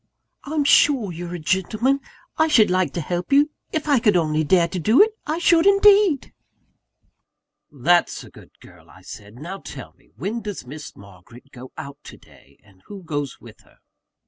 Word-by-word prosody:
"I'm 300 +1 -1
sure 270 -7 +3
you're 175 +1 -7
a - - -6
gentleman. 215 - 0 0.4
I 315 - +2
should 225 -11 +4
like 185 0 +1
to 170 - -3
help 175 - -4
you 290 +2 +4 0.2
if 315 -1 -3
I 285 -4 +3
could 210 -5 +3
only 155 -2 0
dare 170 +2 +3
to 180 +2 -5
do 220 - +3
it, 435 +2 +6 0.2
I 310 +2 -1
should 340 +1 +3
indeed!" 400 -6 +4 1.4
"That's 165 +5 +1
a - - -15
good - - -18
girl," - - -18
I - - -18
said. 105 +1 -12
"Now 175 +9 -8
tell - - -10
me, - - -30
when 200 - -4
does 205 - -7
Miss 150 +4 -10
Margaret 100 +7 -17
go 130 -1 -12
out 140 +1 -9
to - - -12
day; - - -22
and 95 -2 -24
who 200 -2 -10
goes 145 -4 -5
with - - -15
her?" - - -26
185 Hz, 185 wpm, -21 LUFS, -, 1.4 s, it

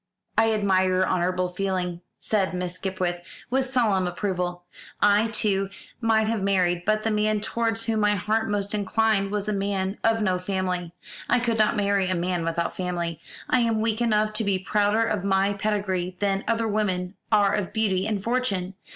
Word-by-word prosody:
"I 225 0 +4
admire 195 -3 +2
your 185 0 +2
honourable 180 0 0
feeling," 180 -2 -2 0.2
said 195 -4 0
Miss 180 -1 -3
Skipwith, 185 -2 -3 0.3
with 265 +1 +1
solemn 220 -8 +2
approval; 180 -1 -2 0.4
"I, 205 +2 +4
too, 200 -3 0 0.3
might 225 -2 +2
have 220 -1 -1
married, 180 -3 +1
but 215 0 +2
the 225 - 0
man 215 0 +1
towards 225 +1 -1
whom 225 -1 0
my 210 0 +3
heart 220 +3 0
most 205 0 -1
inclined 210 0 +1
was 205 0 -2
a 210 - 0
man 195 0 -2
of 225 0 +3
no 185 -3 +1
family. 180 -2 -2 0.4
I - - +4
could 235 -2 0
not 215 +1 +3
marry 200 -2 +1
a 185 - +1
man 175 0 -1
without 165 +1 -2
family. 175 -3 -3 0.3
I 255 - +3
am 230 -2 +1
weak 220 +1 0
enough 215 -2 +2
to 215 +1 -1
be 200 -2 +1
prouder 205 +3 +1
of 210 -4 -1
my 195 0 +2
pedigree 195 -3 -1
than 200 -1 0
other 230 0 +1
women 190 -4 -1 0.2
are 205 -2 +4
of 205 -4 -1
beauty 200 -3 0
and 210 -3 -2
fortune. 210 -6 -1
200 Hz, 180 wpm, -25 LUFS, 185-215 Hz, 0.4 s, I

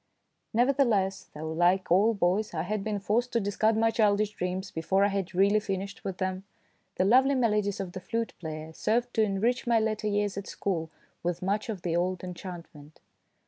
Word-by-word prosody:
Nevertheless, 235 -6 +2
though 155 +1 -5
like 175 +3 +2
all 210 +5 +4
boys 195 +1 0
I 155 - -1
had 205 +2 -2
been 215 -1 -1
forced 225 +5 0
to 235 - +3
discard 215 +2 +1
my 225 0 +3
childish 210 -2 +2
dreams 185 -1 -4
before 190 +4 +1
I - - +2
had 195 -2 -3
really 200 +3 +4
finished 195 -1 -4
with 190 -2 -4
them, 185 0 -2 0.5
the 185 - +2
lovely 260 +6 +5
melodies 210 -5 +1
of 190 -2 -4
the 185 - -6
flute 230 +4 -3
player 155 -1 -6
served 240 +7 0
to 225 - +2
enrich 220 +5 +1
my 235 -1 +4
latter 215 -1 -1
years 205 -1 0
at 200 - -5
school 165 -5 -2 0.3
with 175 0 -2
much 205 +4 -1
of 200 -5 -4
the 170 -2 -1
old 180 +1 -1
enchantment. 170 -4 -9
200 Hz, 185 wpm, -28 LUFS, 180-220 Hz, 0.5 s, lovely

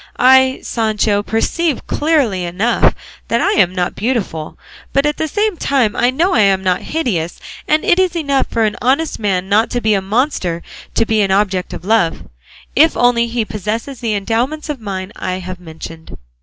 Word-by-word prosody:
I, 260 +1 +5
Sancho, 215 -2 0
perceive 285 +9 -1
clearly 280 - +1
enough 185 +7 +1 0.3
that 230 - +1
I - - +2
am 185 -4 +3
not 180 -1 -2
beautiful, 200 -9 -3 0.4
but 275 +1 +2
at 295 0 0
the 315 - -1
same 420 +3 0
time 260 -8 +1
I 245 - +3
know 330 +9 +1
I - - +3
am 195 -2 +3
not 185 -1 +1
hideous; 195 - -2 0.3
and 305 +1 +2
it 350 - +4
is 370 -2 +2
enough 280 -5 0
for 230 - 0
an 215 -1 0
honest 275 +7 +1
man 190 -3 -1
not 210 +3 +3
to 245 - -1
be 220 -2 +2
a 195 - +1
monster 190 - -1 0.3
to 230 - +3
be 220 -1 +1
an 195 - +1
object 190 -2 +1
of 175 - -8
love, 200 -6 +1 0.5
if 315 +2 +4
only 240 -1 +3
he 230 -1 -1
possesses 220 +6 -4
the 225 -3 -1
endowments 240 +10 -2
of 285 -5 -4
mind 190 -2 -5
I 185 - -3
have 185 0 -7
mentioned." 160 -1 -10
225 Hz, 185 wpm, -17 LUFS, 190-270 Hz, 0.5 s, I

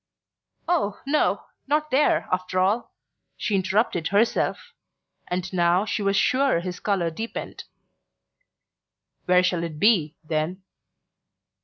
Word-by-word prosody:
"Oh, 305 - 0
no, 295 +2 +1 0.2
not 300 +1 0
there, 275 +3 +2
after 185 0 -2
all!" 200 +6 +1 0.5
she 210 - -2
interrupted 190 -3 +1
herself; 210 +4 0 0.5
and 180 +1 -3
now 175 +2 +3
she 210 0 -2
was 200 0 +1
sure 265 -7 +3
his 180 +1 -5
colour 190 -5 0
deepened. 225 +8 -6 1.6
"Where 180 0 +4
shall 180 -2 +1
it 160 -3 -5
be, 170 -6 +3
then?" 160 +4 -2
190 Hz, 115 wpm, -24 LUFS, 175-225 Hz, 1.6 s, Where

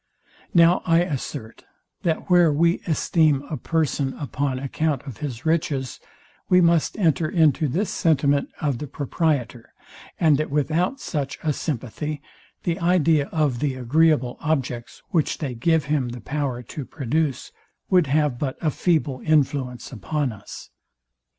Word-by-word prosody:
Now 170 +1 +6
I 165 -1 +3
assert, 135 -7 -5 0.4
that 160 -2 -1
where 175 -3 +5
we 170 +4 +2
esteem 155 -3 +2
a - - -1
person 150 -4 -1
upon 140 -2 -2
account 140 +1 -1
of 135 -6 -8
his 130 -3 -6
riches, 150 -5 -1 0.5
we 180 - +6
must 170 +1 +3
enter 160 -5 +2
into 155 -3 +3
this 185 - -1
sentiment 145 -3 +2
of 140 -5 -1
the 150 - -5
proprietor, 140 -4 -2 0.5
and 155 -4 +4
that 155 - -1
without 160 - 0
such 145 - -3
a 155 -2 +1
sympathy 145 +2 -4 0.4
the 170 -1 -1
idea 165 -4 +3
of 145 -6 0
the 140 -2 -1
agreeable 130 0 +2
objects, 130 -6 -3
which 160 -4 0
they 140 -5 -4
give 160 +6 +1
him 140 -4 0
the 120 0 -7
power 135 -1 -3
to 140 +5 -7
produce, 140 +1 -2 0.4
would 180 -5 +4
have 145 -3 +1
but 135 -3 -2
a 155 - 0
feeble 140 -6 0
influence 140 -5 0
upon 135 +4 -2
us. 110 - -11
150 Hz, 145 wpm, -23 LUFS, 130-160 Hz, 0.5 s, Now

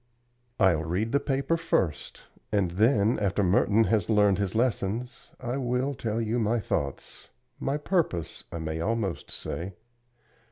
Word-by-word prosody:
"I'll 90 -6 +4
read 95 +8 -1
the 140 - +3
paper 140 +4 0
first, 165 - -1 0.3
and 100 -5 +1
then, 110 +3 +3
after 100 0 +1
Merton 100 +4 +4
has 110 -3 +1
learned 105 -3 +4
his 100 0 -1
lessons, 120 +1 -1
I 125 +1 -3
will 130 +1 0
tell 115 -3 -2
you 115 +1 0
my 115 +1 +1
thoughts 70 -9 -4 0.3
my 135 +2 -1
purpose, 150 - -1
I - - -4
may 80 0 -3
almost 105 -2 -2
say. 90 +2 -5
110 Hz, 145 wpm, -27 LUFS, 95-125 Hz, 0.3 s, I'll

